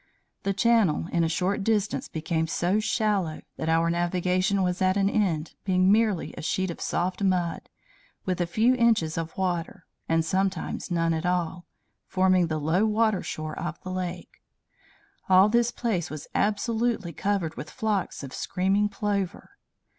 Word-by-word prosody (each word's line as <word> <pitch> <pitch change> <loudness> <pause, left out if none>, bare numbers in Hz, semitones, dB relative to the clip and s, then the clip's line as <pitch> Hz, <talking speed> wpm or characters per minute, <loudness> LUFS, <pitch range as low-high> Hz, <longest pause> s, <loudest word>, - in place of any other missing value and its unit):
The 195 - 0
channel 220 -6 +3
in 170 -1 +2
a 165 - +1
short 190 +4 0
distance 210 -1 0
became 160 0 -2
so 180 +5 +1
shallow 205 -7 0 0.2
that 160 - -2
our 165 +1 +3
navigation 180 +3 +1
was 180 0 -1
at 185 +1 +3
an 195 -1 +3
end, 170 -7 0
being 185 0 +3
merely 215 -4 +2
a - - -8
sheet 190 +3 -1
of - - -9
soft 180 +3 -1
mud, 180 -3 0 0.6
with 185 -1 -1
a 175 - 0
few 220 +8 +3
inches 230 -10 +2
of 165 -1 -4
water, 180 +1 -2 0.2
and 165 0 +2
sometimes 190 +1 -1
none 165 -2 +1
at 160 +2 -2
all, 180 0 -1 0.4
forming 185 -2 +3
the 155 -1 -2
low 160 +6 +1
water 215 -2 +2
shore 155 0 -5
of 170 -1 -4
the 185 - -5
lake. 180 -1 -5 0.9
All 190 +2 +7
this 235 +1 +3
place 225 -8 -2
was 150 -1 -7
absolutely 220 -2 0
covered 180 -2 -1
with 155 - -7
flocks 215 - -2
of 135 - -8
screaming 195 +2 0
plover. 200 - -3
185 Hz, 160 wpm, -26 LUFS, 170-205 Hz, 0.9 s, All